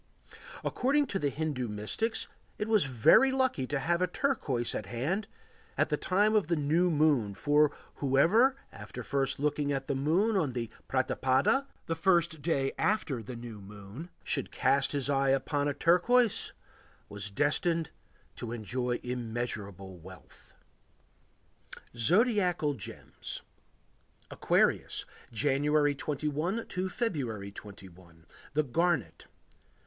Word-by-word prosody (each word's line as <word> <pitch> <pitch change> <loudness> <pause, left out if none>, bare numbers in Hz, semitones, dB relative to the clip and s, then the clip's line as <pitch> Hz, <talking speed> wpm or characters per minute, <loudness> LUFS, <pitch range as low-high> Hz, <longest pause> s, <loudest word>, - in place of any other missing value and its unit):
According 285 +3 +1
to 195 - 0
the 145 - +1
Hindu 145 -4 -2
mystics 105 - -1 0.3
it 210 - -2
was 215 -7 +3
very 135 - +5
lucky 260 - +1
to 145 - -1
have 170 +6 0
a 180 - +3
turquoise 145 - -1
at 105 - -4
hand 155 - -2 0.5
at - - +2
the - - +2
time 205 +3 +2
of 210 -6 +3
the 170 - +1
new 160 +4 +2
moon, 145 - +2
for 145 +7 +3 0.3
whoever, 170 - +4 0.2
after - - -8
first 135 -2 -1
looking 145 0 0
at 135 -1 -2
the - - -1
moon 170 +11 +2
on 155 -9 +1
the 115 -2 -4 0.2
pratipada 130 - +2 0.2
(the 165 - -1
first 170 -2 +2
day 140 -4 0
after 160 - 0
new 115 -2 -8
moon), 105 - -10
should - - -1
cast 140 0 +2
his 140 -2 -1
eyes 135 -1 +3
upon 145 +2 -1
a 145 - 0
turquoise, 220 +7 +3 0.6
was 100 0 -6
destined 150 - 0 0.5
to 115 - -5
enjoy 120 +2 -2
immeasurable 110 -6 -5
wealth. 90 -2 -15 1.4
ZODIACAL 180 - +3
GEMS 115 -8 -8 0.9
Aquarius. - - +1 0.3
January 145 +4 +2
21 150 +8 -2
to 185 +1 -3
February 130 - -2
21. 95 -5 -13 0.3
The 155 - +3
Garnet. 145 - -1
145 Hz, 125 wpm, -30 LUFS, 120-175 Hz, 1.4 s, very